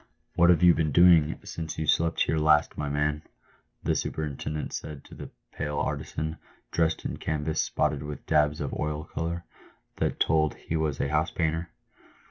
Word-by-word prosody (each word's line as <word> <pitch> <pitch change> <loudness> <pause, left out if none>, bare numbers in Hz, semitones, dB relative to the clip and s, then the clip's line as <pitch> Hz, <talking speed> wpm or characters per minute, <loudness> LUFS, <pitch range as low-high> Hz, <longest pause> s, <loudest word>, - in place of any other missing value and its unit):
" - - -45
What 85 0 +5
have 90 0 +5
you 90 -1 +8
been 80 -2 0
doing 85 -1 +6
since 80 -2 -6
you 80 - -1
slept 80 +2 +2
here 80 - 0
last, 75 -1 +3
my 75 -1 -3
man 75 +1 0 0.3
?'? - - -37
the - - +1
superintendent 75 0 -3
said 75 -2 -6
to - - -10
a - - -19
pale 75 -1 -3
artisan, 80 +2 -3 0.3
dressed 80 -1 0
in - - -3
canvas 80 0 -1
spotted 75 -2 0
with 75 -1 -7
dabs 75 -1 +2
of 70 - -3
oil 75 0 -2
colour, 85 +2 -4 0.5
that - - -1
told 80 -2 +2
he 80 - -5
was 80 -3 -1
a 70 - 0
house 75 +2 +1
painter. 80 +1 -1
75 Hz, 180 wpm, -27 LUFS, 75-80 Hz, 0.5 s, you